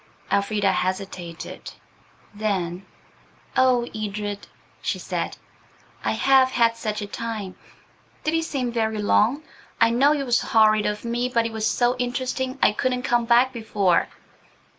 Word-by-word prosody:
Elfrida 200 0 +2
hesitated. 185 -3 -4 0.6
Then, 190 -3 -2 0.7
"Oh, 250 -2 +3
Edred," 205 -1 -4 0.3
she - - -1
said, - - -4 0.7
"I - - 0
have 265 -1 +4
had 230 -2 +2
such 215 -2 -3
a - - -3
time! 215 -3 -5 0.7
Did 310 - 0
it 325 0 +1
seem 260 -6 -2
very 220 -2 -1
long? 220 +7 +2 0.4
I 230 0 +5
know 275 +5 +4
it 285 -2 -2
was 240 -2 +2
horrid 215 -1 +4
of 210 +2 -3
me, 240 +2 -1
but 230 -2 +1
it 230 - -2
was 220 -1 -1
so 245 +3 +2
interesting 255 +1 -2
I - - +6
couldn't 250 +3 -1
come 240 -1 +1
back 245 +2 +4
before." 205 -6 +1
230 Hz, 140 wpm, -24 LUFS, 205-250 Hz, 0.7 s, I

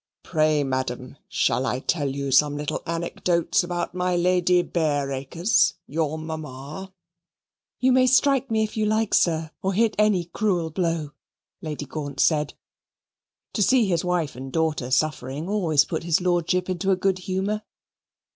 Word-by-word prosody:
Pray, 155 -3 +2
madam, 130 -1 -3
shall 130 - +1
I 125 -1 -1
tell 145 0 -1
you 140 0 -3
some 145 +2 +4
little 150 0 -3
anecdotes 170 +2 0
about 175 0 -3
my 180 0 0
Lady 180 0 +3
Bareacres, 155 +4 +1
your 155 +1 -2
mamma?" 155 +2 -7 0.9
"You 260 +1 +3
may 255 0 +4
strike 270 0 +3
me 220 -1 +2
if 215 - -4
you 215 -1 +1
like, 215 0 0
sir, 160 -2 +2
or 190 +1 0
hit 225 +1 +3
any 210 -5 +3
cruel 175 -2 -1
blow," 165 -3 -1 0.5
Lady 150 -4 -5
Gaunt 145 -1 -6
said. 150 -2 +2 1.0
To 215 - -1
see 245 +3 +4
his 175 -4 0
wife 175 -6 -1
and 130 +1 -7
daughter 155 -5 -1
suffering 145 +2 -1
always 165 -8 +2
put - - -3
his 165 -1 +1
Lordship 180 0 0
into 185 +1 -2
a 190 - +4
good 185 0 0
humour. 190 +3 -2
170 Hz, 150 wpm, -24 LUFS, 150-190 Hz, 1.0 s, some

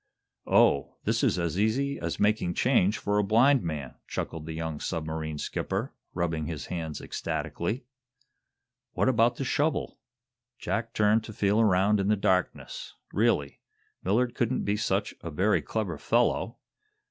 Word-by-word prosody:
"Oh, 70 - +3
this - - 0
is - - +3
as 85 +1 -1
easy 135 +7 +1
as 85 0 -3
making 105 -4 +2
change 110 -5 +3
for 105 0 0
a - - +3
blind 120 +6 +4
man!" 75 -6 -4
chuckled 80 -1 -4
the 80 - -4
young 80 -1 -4
submarine 80 -2 -3
skipper, - - -3 0.2
rubbing 80 -3 -1
his 80 -4 -5
hands 80 -4 -4
ecstatically. 110 +9 -3 1.1
What - - +1
about 120 -2 +3
the - - -3
shovel? 150 +4 0 0.6
Jack 115 -1 -3
turned 110 +1 +3
to 110 - -8
feel 105 +2 +2
around 100 0 +3
in 100 - 0
the 105 - +4
darkness. 95 -2 -1 0.2
Really, - - +1 0.4
Millard 120 +6 +1
couldn't 120 +1 0
be 100 - +1
such 105 - 0
a 85 - -5
very 95 +7 +2
clever 95 -9 -3
fellow! - - +1
100 Hz, 145 wpm, -28 LUFS, 85-110 Hz, 1.1 s, blind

